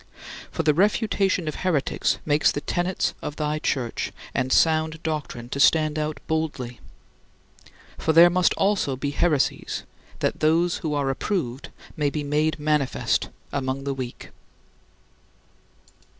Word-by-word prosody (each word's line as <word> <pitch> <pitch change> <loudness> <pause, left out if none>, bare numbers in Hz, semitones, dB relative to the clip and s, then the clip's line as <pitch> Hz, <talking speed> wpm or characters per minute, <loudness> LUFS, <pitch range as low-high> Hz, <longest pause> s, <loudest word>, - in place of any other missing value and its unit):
For 165 - -2
the 150 -1 +4
refutation 195 -1 +1
of 155 - -1
heretics 170 -7 0
makes 150 0 +3
the - - -3
tenets 175 +3 -1
of 150 - -5
thy 150 0 -1
Church 130 -6 -2 0.2
and 130 - -1
sound 160 +1 +2
doctrine 150 -7 -4
to 140 - -4
stand 155 +1 +4
out 150 0 -2
boldly. 145 -7 -2 1.2
"For 160 - +1
there 170 +2 +8
must 180 0 +3
also 195 -9 +1
be 140 +2 -3
heresies 150 -1 0 0.3
[factions] - - -23
that - - 0
those 165 +3 +2
who 155 -2 -2
are 140 -2 +1
approved 135 - -3 0.3
may 150 -2 +1
be 150 +1 -3
made 150 +2 +1
manifest 150 -2 0 0.2
among 135 -1 -2
the 140 0 -2
weak." 130 -2 -7
155 Hz, 135 wpm, -24 LUFS, 140-165 Hz, 1.2 s, there